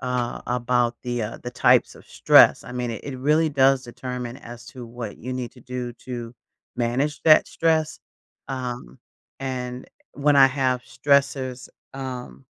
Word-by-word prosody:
uh, 125 -1 -2
about 120 -1 0
the, 120 -2 -2
uh 105 - -5
the 125 - -5
types - - +3
of - - -16
stress, - - +5
I 125 - -10
mean 125 -1 -3
it 110 - -6
it 135 -3 -6
really 155 +4 +2
does 135 -2 +3
determine 125 0 -6
as 120 -1 -11
to 130 -2 -9
what 115 -2 -7
you 130 +2 -6
need 125 -2 -4
to 125 - -17
do 125 0 -5
to 120 -2 -6 0.4
manage 125 +5 -1
that 155 -1 +6
stress, 160 -1 0 0.5
um, 125 - -5 0.4
and 125 -1 -5 0.3
when 145 0 +2
I 135 -1 +8
have 130 -1 0
stressors, 130 -2 0 0.3
um 125 - -7
125 Hz, 155 wpm, -23 LUFS, 120-135 Hz, 0.5 s, I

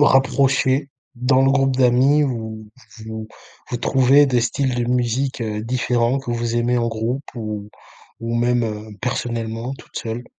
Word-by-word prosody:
rapprocher 135 0 +3 0.3
dans 130 +2 +2
le 135 - +4
groupe 135 -1 +2
d'amis 130 +4 +4
où 110 -4 -5 0.3
vous 110 0 -7 0.4
vous - - -1
trouvez 135 +4 +4
des 125 -3 +2
styles 125 +2 0
de 120 - 0
musique, 125 +2 0
heu, 105 -2 -3
différents 120 +1 +1
que 135 -3 -6
vous 120 0 -1
aimez 120 +1 +1
en 115 0 0
groupe 115 +5 -2
ou 105 -3 -5 0.5
ou 115 0 -3
même, 120 0 +2
heu, 105 -1 -5
personnellement, 115 -1 -3
toute - - -17
seule? 115 +2 -4
120 Hz, 155 wpm, -21 LUFS, 115-130 Hz, 0.5 s, le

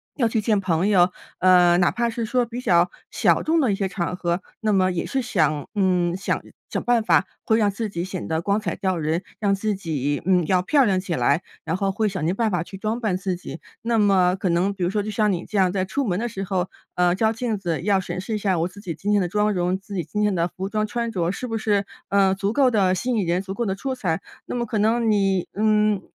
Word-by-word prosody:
要 240 -5 +2
去 225 - 0
见 210 -2 +2
朋 180 0 +1
友， 180 -3 +4 0.3
呃， 180 -1 +5
哪 175 - +3
怕 235 -1 0
是 230 0 -3
说 245 +2 +1
比 240 +2 -6
较 175 -5 +3 0.2
小 - - +2
众 325 +1 +2
的 250 -7 +2
一 - - +1
些 195 -1 -1
场 180 -1 -3
合， 175 0 -1 0.2
那 215 -1 +1
么 185 -1 +3
也 170 - -2
是 270 -1 -1
想 155 -10 0
嗯， 180 -3 +2
想 195 - -1 0.3
想 - - -3
办 240 -2 +2
法 - - +3 0.2
会 220 - +3
让 210 -2 +3
自 215 +1 -4
己 170 -1 -3
显 185 -1 -5
得 160 0 0
光 200 +4 +1
彩 215 - -3
照 190 -3 -1
人， 160 +3 -1 0.2
让 200 -2 +2
自 210 +1 -1
己， 145 -6 -2
嗯， 180 -3 +3
要 185 +1 +3
漂 275 +8 +3
亮 190 -4 +2
起 185 -3 -3
来， 140 +6 +2 0.2
然 - - -1
后 195 -1 0
会 215 +3 0
想 185 -5 -3
尽 175 - +1
办 225 0 +1
法 175 -3 0
去 195 +2 -10
装 220 +4 -2
扮 205 -5 0
自 185 -1 -2
己， 175 -1 -8 0.2
那 230 0 +1
么 185 -3 +4
可 190 - -2
能 180 +4 +1
比 190 -2 -4
如 175 - +1
说 205 +1 -1
就 215 - -4
像 210 0 +2
你 180 -1 -3
这 210 - -4
样 185 -2 +3
在 185 -1 0
出 275 +8 -2
门 180 -3 0
的 240 +2 -2
时 195 -3 -5
候， 185 -1 -1 0.3
呃， 180 0 +3
照 220 +2 +2
镜 230 -2 -2
子 170 -5 -2
要 195 0 +2
审 185 - -5
视 220 +3 -3
一 - - 0
下 190 -4 0
我 170 - +1
自 200 +2 -13
己 175 -5 -4
今 205 +5 -2
天 205 -1 +3
的 180 - 0
妆 210 +3 +1
容， 180 0 0
自 200 +1 -9
己 175 - -1
今 210 - -3
天 210 -2 +2
的 170 0 +1
服 190 +2 -5
装 215 0 0
穿 235 0 -2
着 175 -3 0
是 250 - -5
不 225 -1 -2
是， 205 -2 +1 0.2
呃， 195 -1 +3
足 200 +2 -1
够 260 -1 +4
地 190 -4 +3
吸 245 +7 -2
引 215 -5 +1
人、 175 +2 +1
足 195 0 -6
够 235 +3 -2
地 190 - -1
出 260 +6 -3
彩？ 180 -6 -1 0.2
那 - - -5
么 240 -1 -1
可 215 -1 -3
能 225 +2 +2
你， 195 -3 +1
嗯， 210 -1 +2
195 Hz, 285 characters per minute, -23 LUFS, 180-215 Hz, 0.3 s, 呃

